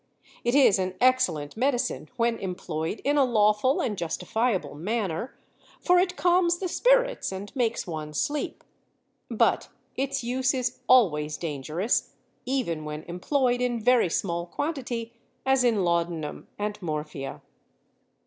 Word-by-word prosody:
It 240 +2 +1
is 260 -9 +6
an 185 0 -2
excellent 245 - +2
medicine 255 +1 -1
when 235 -1 +1
employed 180 -1 -4
in 290 +1 +2
a 280 - +6
lawful 220 +2 +3
and 215 - -1
justifiable 180 - -1
manner, 195 - -3 0.4
for 360 0 +4
it 360 0 +1
calms 350 -1 +3
the 370 - -3
spirits - - +2
and 195 +5 -7
makes 235 -3 0
one 155 -3 -6
sleep. 290 - -2 0.7
But - - +2 0.3
its 270 -1 -2
use 255 +2 0
is 250 -1 -2
always 155 -12 +4
dangerous, 160 - -2 0.3
even 235 - -1
when 150 0 -6
employed 245 - 0
in 245 -2 0
very 240 -4 +4
small 170 0 -2
quantity, 245 - -4 0.3
as 265 -1 +3
in 225 -5 +2
laudanum 170 -3 -1
and 210 0 -3
morphia. 150 -4 -5
225 Hz, 130 wpm, -26 LUFS, 170-255 Hz, 0.7 s, is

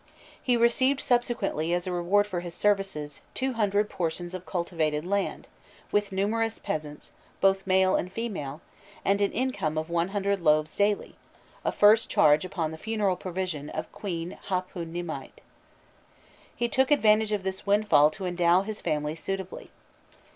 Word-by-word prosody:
He 245 -2 +2
received 260 +4 +3
subsequently, 240 - 0
as 175 - -2
a 185 - -3
reward 180 +4 +2
for 185 -4 -3
his 175 -1 -7
services, 195 -9 0
two 265 0 -1
hundred 210 -2 +1
portions 175 -1 -3
of 185 0 -7
cultivated 165 -4 -1
land, 200 +2 -2 0.4
with 205 -1 +1
numerous 220 +4 0
peasants, 150 -1 -5 0.3
both 195 0 +2
male 190 0 +4
and 180 - -1
female, 180 -11 -4 0.4
and 200 +1 +2
an 200 - +2
income 200 -12 -1
of 160 +2 -3
one 170 0 +1
hundred 200 0 -1
loaves 155 -2 +2
daily, 205 0 0 0.5
a - - +1
first 210 +2 +5
charge 150 0 +5
upon 170 -4 -3
the 160 - -8
funeral 210 -3 0
provision 180 -5 -4
of - - -5
Queen 175 -3 -5
Hâpûnimâit. 175 -2 -4 1.2
He 240 - 0
took 265 +2 +2
advantage 220 -6 +4
of 205 -2 -1
this 190 +1 -4
windfall 200 -8 +5
to 185 +5 -7
endow 175 +1 +3
his 215 +1 -6
family 150 0 -1
suitably. 190 +2 -5
190 Hz, 150 wpm, -27 LUFS, 170-210 Hz, 1.2 s, first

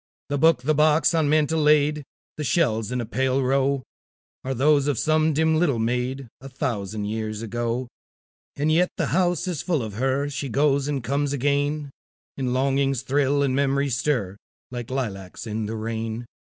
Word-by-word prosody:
The 145 -1 -1
book, 160 -4 +4
the 155 +3 +2
box 155 +3 +4
on 160 -3 +2
mantel 155 +1 +2
laid, 150 0 +3 0.3
The 155 - -3
shells 115 - +1
in 125 - -1
a - - -4
pale 130 +3 0
row, 135 +1 +1 0.6
Are 135 0 -2
those 145 +2 +3
of 145 -4 0
some 155 +3 +2
dim 160 +1 +2
little 150 -8 +2
maid, 125 +3 -1
A 135 - -9
thousand 110 -5 -3
years 110 0 -3
ago. 120 +2 -2 0.7
And 150 +2 +1
yet 175 +3 +3
the - - +1
house 175 -1 +1
is 175 -5 -2
full 165 -9 0
of 110 -2 -6
her; 135 +2 +1
She 140 -1 -4
goes 140 +2 +2
and 140 -4 -2
comes 140 +3 0
again; 145 +1 0 0.4
And 130 -2 -2
longings 135 0 +1
thrill, 140 +1 +2
and 130 -2 +1
memories 140 -1 +1
stir, 115 -10 -1 0.3
Like 120 -2 -6
lilacs 105 -8 -4
in 110 -1 -3
the 110 - -4
rain. 110 +1 -4
135 Hz, 175 wpm, -24 LUFS, 120-150 Hz, 0.7 s, book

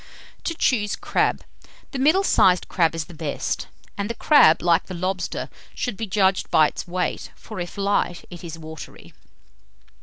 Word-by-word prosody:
TO 335 - -2
CHOOSE 210 -9 +1
CRAB. - - 0 0.5
The 275 - -4
middle 315 +9 +4
sized 185 - +4
crab 165 -2 +1
is 165 -1 -3
the 175 - -13
best; 155 -3 -3 0.3
and 200 +1 -3
the 235 - -3
crab, 195 - +5
like 170 0 +3
the 185 - -6
lobster, 185 +1 -3 0.3
should 245 -5 -2
be 225 +2 -4
judged 190 -1 +2
by 155 - +5
its - - -7
weight; 180 +1 -2
for - - -9
if 175 +3 -6
light, 200 -3 0
it 175 0 -10
is 165 -1 -7
watery. 160 -1 -10
185 Hz, 170 wpm, -23 LUFS, 170-210 Hz, 0.5 s, crab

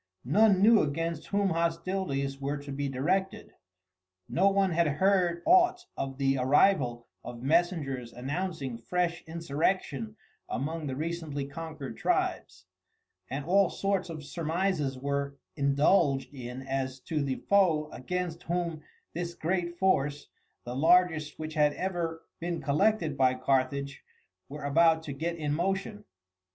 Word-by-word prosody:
None 195 - +4
knew 220 0 +7
against 160 +2 -2
whom 200 -1 +1
hostilities 165 -5 -1
were 140 +2 -1
to 140 0 -8
be 140 0 -2
directed. 185 +9 -1 0.7
No 195 +3 +3
one 195 -1 +2
had 170 0 +2
heard 175 +2 +2
aught 360 0 +4
of 135 -1 -4
the 135 -1 +1
arrival 130 -3 +3 0.2
of 120 0 -8
messengers 145 -6 0
announcing 135 -1 -4
fresh 175 +7 -1
insurrection 155 - -1 0.3
among 155 +3 -3
the 130 - -3
recently 155 -2 -3
conquered 155 -1 -7
tribes, - - -1 0.6
and 140 +2 -4
all 195 +2 +4
sorts 195 -2 -1
of 155 -2 -6
surmises 160 -2 -1
were 140 +1 -2 0.2
indulged 140 0 +2
in 125 -1 -7
as 130 -1 -3
to 155 +3 -2
the 135 -2 -1
foe 175 -7 +3
against 175 +4 -4
whom 170 -2 -2 0.3
this 170 0 -4
great 175 +1 -2
force, 145 -6 +1 0.3
the 120 +1 -6
largest 160 0 +3
which 155 0 -5
had 150 -2 +3
ever 170 -3 -3 0.2
been 170 0 -3
collected 160 +1 +1
by 130 -1 +3
Carthage, 135 +1 0 0.5
were 145 +1 -7
about 160 +3 +4
to 145 - -5
get 165 +5 -3
in 150 -3 -2
motion. 175 - -2
155 Hz, 135 wpm, -29 LUFS, 140-175 Hz, 0.7 s, knew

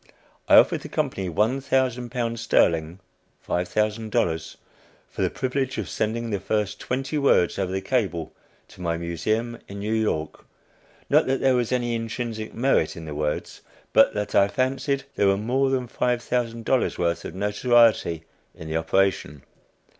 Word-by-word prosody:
I - - +8
offered - - +6
the - - -9
company 95 -2 -2
one 110 +10 +1
thousand 130 -2 0
pounds 115 -2 -2
sterling 85 -6 +2 0.5
($5,000) 90 -3 -1 0.5
for - - -6
the - - +2
privilege 130 0 -2
of - - -3
sending 115 +1 -2
the 100 - -1
first 105 +1 -2
twenty 135 +4 -2
words 100 -12 +3
over 95 -2 -1
the 95 0 -2
cable 95 -7 -1 0.4
to - - -14
my 85 -1 -1
Museum 110 +8 -2
in 100 - -8
New 105 +2 -2
York 105 -9 -1 0.6
not - - +4
that 135 0 +1
there 135 -1 +3
was 120 -2 0
any 120 -2 0
intrinsic 115 -1 -4
merit 120 - +1
in 80 - -8
the 75 - -6
words, 75 0 -3 0.3
but - - +5
that 105 0 -3
I 100 - +5
fancied 135 +4 -1
there 100 - +3
was 100 0 +3
more 130 +6 +1
than 130 -2 -1
$5,000 120 0 0
worth 85 -1 0
of 80 - -7
notoriety 105 -4 +3 0.3
in 80 - -9
the 80 +1 -1
operation. 80 -3 0
110 Hz, 155 wpm, -24 LUFS, 90-125 Hz, 0.6 s, I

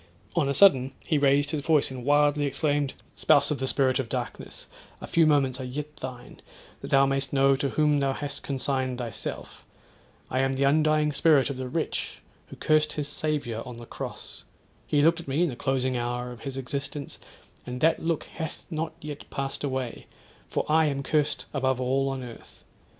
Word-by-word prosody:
On 155 -5 +2
a - - +1
sudden 135 -7 +5
he 155 -3 0
raised 145 +1 +3
his 155 - -1
voice 150 -2 +2
and 130 -2 -7
wildly 145 +1 +3
exclaimed—'Spouse 145 0 +1
of 145 - -1
the 130 - -1
spirit 130 -1 +2
of 125 -4 -3
darkness, - - -5 0.3
a - - -7
few 165 -2 +3
moments 135 -3 +2
are - - -4
yet 150 +4 -5
thine; 125 -1 -8 0.4
that - - -7
thou 135 0 +5
may'st 135 0 0
know 135 0 +4
to 140 0 0
whom 150 0 +2
thou 135 -1 +1
hast 145 0 -4
consigned 130 -2 -1
thyself. 115 -4 -5 0.7
I 130 - +1
am 135 0 +2
the 135 +1 0
undying 150 +1 +3
spirit 140 -2 +4
of 135 - -6
the 130 -1 -4
wretch 160 +3 -3 0.3
who - - -10
curst 155 0 +2
his 145 -1 -2
Saviour 145 -6 -2
on 125 -2 -9
the 120 - -9
cross. - - -7 0.4
He 145 -1 +2
looked 165 +2 +4
at 170 - -10
me 140 +6 +1
in 175 - +2
the 125 - -5
closing 130 0 0
hour 120 0 -2
of 120 - -10
his 135 -1 -5
existence, 140 +2 -5 0.5
and 125 0 -4
that 165 +1 +3
look 165 -1 0
hath 160 -2 -7
not 160 0 -2
yet 150 -1 -8
passed 135 +1 -3
away, 130 -3 -3 0.4
for - - -1
I 155 +1 +4
am 140 -1 -2
curst 150 +1 0
above 130 -2 +1
all 135 +2 +1
on 135 -1 -4
earth. 120 -2 -12
140 Hz, 190 wpm, -27 LUFS, 130-150 Hz, 0.7 s, sudden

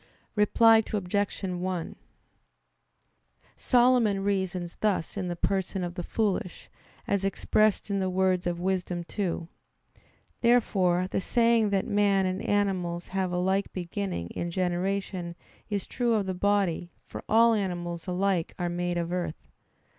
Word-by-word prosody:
Reply 225 +2 +5
Obj. 205 0 -1
1: 180 -2 -3 1.6
Solomon 240 -6 +3
reasons 190 -3 -2
thus 205 -6 0
in 190 -3 -3
the 175 - -3
person 190 +1 -1
of 175 -1 -4
the 175 - -4
foolish, 195 -1 -2 0.4
as 200 -1 +1
expressed 210 +1 +1
in 200 - +1
the 190 -1 0
words 185 -1 +1
of 175 -1 -2
Wisdom 180 -1 -1
2. 170 -2 -3 0.9
Therefore 190 -7 +3
the 190 - -2
saying 230 0 +3
that 195 -1 0
man 200 -2 +2
and 185 +2 -2
animals 190 -5 -1
have 190 -1 -1
a 180 - -1
like 190 +2 0
beginning 180 - -4
in 170 - -4
generation 180 0 -2 0.3
is 205 -2 -2
true 240 -2 0
of 205 -2 0
the 190 - -2
body; 185 -3 0 0.2
for - - -8
all 230 +1 +6
animals 175 -4 -3
alike 180 -1 0
are 175 -1 -1
made 175 0 -2
of 170 0 -2
earth. 175 -3 -4
190 Hz, 140 wpm, -28 LUFS, 175-205 Hz, 1.6 s, all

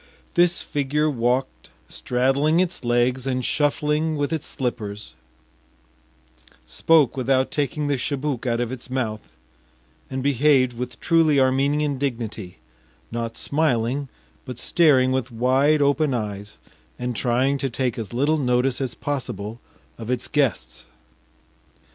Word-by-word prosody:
This 175 0 +3
figure 150 +2 0
walked 125 +1 -1 0.2
straddling 135 +6 +1
its 185 -5 -1
legs 120 +2 +1
and 130 -2 -1
shuffling 150 +2 +1
with 145 +2 -1
its 160 -2 -3
slippers, 105 - -4 1.5
spoke 150 - +3
without 130 0 +1
taking 145 +1 -1
the 145 -1 0
chibouk 140 -1 -2
out 115 -1 0
of 120 -1 -2
its 130 -1 -7
mouth, 110 - -3 0.8
and 130 -1 -3
behaved 135 -2 +3
with 125 0 -6
truly 160 -4 +3
Armenian 140 +2 +1
dignity, 115 - -4 0.5
not 115 0 -4
smiling, 135 -2 0 0.3
but 125 -2 -8
staring 135 -4 +3
with 130 -1 -1
wide 130 +5 +2
open 140 -1 +2
eyes 105 -2 -5 0.4
and 125 -1 -3
trying 130 +4 +1
to 135 - -1
take 125 -1 -2
as 110 -4 -5
little 145 +6 +1
notice 125 0 +1
as 130 -3 -2
possible 115 -6 -4 0.4
of 115 0 -7
its 125 -1 -1
guests. 110 - -1
130 Hz, 125 wpm, -23 LUFS, 120-145 Hz, 1.5 s, This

